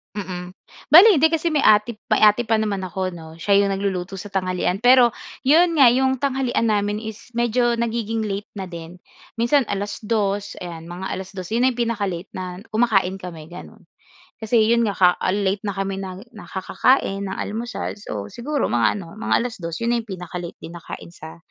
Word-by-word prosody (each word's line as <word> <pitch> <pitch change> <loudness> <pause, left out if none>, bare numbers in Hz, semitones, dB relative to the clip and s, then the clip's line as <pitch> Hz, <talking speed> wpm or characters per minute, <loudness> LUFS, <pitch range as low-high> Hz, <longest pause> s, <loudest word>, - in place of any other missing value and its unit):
Mm, 180 -3 -6 0.4
bale 355 +8 +10
hindi 320 +3 +4
kasi 325 +1 0
may 305 -4 +1
ate 215 +2 +4 0.2
may - - +4
ate 215 +3 +5
pa 220 -1 +1
naman 200 -3 -2
ako 185 -1 -3
'no. 160 0 -11
Siya 200 +3 +2
'yong 200 0 +3
nagluluto 195 -1 -3
sa 205 - -7
tanghalian. 185 +1 -1
Pero 245 -2 +6 0.3
'yon 335 +4 +5
nga 265 - +9
'yong 265 +1 +2
tanghalian 260 -3 0
namin 205 0 0
is 220 +2 -9
medyo 240 0 +1
nagiging 225 -1 -1
late 200 +1 -5
na 190 -3 -6
din. 170 0 -9 0.4
Minsan 265 +4 +3
alas 205 +2 -4
dos 205 -2 -1
ayan, 170 -2 -7
mga 175 +3 -6
alas 190 0 -7
dos 185 -3 -7
'yon 230 +4 0
na 260 - +4
'yong 245 - -9
pinaka-late 200 -6 -2
na 180 -1 -6 0.2
kumakain 200 -5 +2
kami 170 -5 -9
gano'n. 185 +2 -12 0.5
Kasi 220 0 +3
'yon 235 +1 +3
nga 205 -3 -1
ka 180 -1 +5
ah - - -2
late 195 0 0
na 200 -2 -4
kami 195 0 -2
nang 190 +2 -8
nakakakain 200 +1 0
ng 190 - -5
almusal 230 +3 -4
so 105 - -6
siguro 275 - -3
mga 120 - +1
ano, 170 -4 -9
mga 220 +2 0
alas 240 - -4
dos 165 0 -4
'yon 235 +1 0
ay 235 - +1
pinaka-late 180 -1 -7
din 165 - -10
nakain 170 0 -9
sa 160 -1 -11
205 Hz, 195 wpm, -22 LUFS, 185-235 Hz, 0.5 s, bale